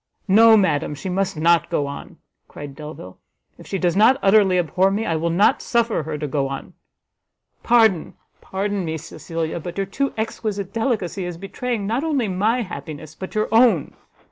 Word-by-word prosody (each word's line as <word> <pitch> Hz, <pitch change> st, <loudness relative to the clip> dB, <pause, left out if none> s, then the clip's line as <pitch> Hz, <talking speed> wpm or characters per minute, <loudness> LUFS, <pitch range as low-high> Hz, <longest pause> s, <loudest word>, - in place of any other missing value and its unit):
"No, 220 Hz, +3 st, +7 dB
madam, 150 Hz, -7 st, +1 dB
she 185 Hz, -, -6 dB
must 185 Hz, -2 st, -1 dB
not 170 Hz, +1 st, +3 dB
go 145 Hz, -, 0 dB
on!" 140 Hz, 0 st, -8 dB, 0.3 s
cried 145 Hz, -2 st, -9 dB
Delvile, 150 Hz, -11 st, -10 dB, 0.4 s
"if -, -, -13 dB
she 195 Hz, -, -2 dB
does 175 Hz, -2 st, 0 dB
not 220 Hz, +6 st, +5 dB
utterly 195 Hz, -2 st, +4 dB
abhor 180 Hz, +3 st, +2 dB
me, 210 Hz, +3 st, -1 dB
I 165 Hz, -, 0 dB
will 165 Hz, +2 st, -1 dB
not 180 Hz, +5 st, +3 dB
suffer 235 Hz, -5 st, 0 dB
her 155 Hz, 0 st, -5 dB
to 150 Hz, -, -4 dB
go 140 Hz, 0 st, -1 dB
on; 135 Hz, 0 st, -7 dB, 0.9 s
Pardon, 220 Hz, -8 st, +3 dB, 0.3 s
pardon 200 Hz, 0 st, -3 dB
me, 160 Hz, -1 st, -3 dB
Cecilia, 165 Hz, +1 st, -5 dB
but 175 Hz, +2 st, -7 dB
your 195 Hz, -, 0 dB
too 275 Hz, +8 st, -2 dB
exquisite 210 Hz, -3 st, -3 dB
delicacy 220 Hz, -5 st, -1 dB
is 175 Hz, -1 st, -5 dB
betraying 210 Hz, +3 st, -4 dB
not 230 Hz, +7 st, -1 dB
only 285 Hz, -8 st, 0 dB
my 215 Hz, +6 st, 0 dB
happiness, 155 Hz, -5 st, -8 dB
but 190 Hz, +6 st, -9 dB
your 215 Hz, -, +1 dB
own. 225 Hz, -, +3 dB
190 Hz, 175 wpm, -21 LUFS, 160-220 Hz, 0.9 s, No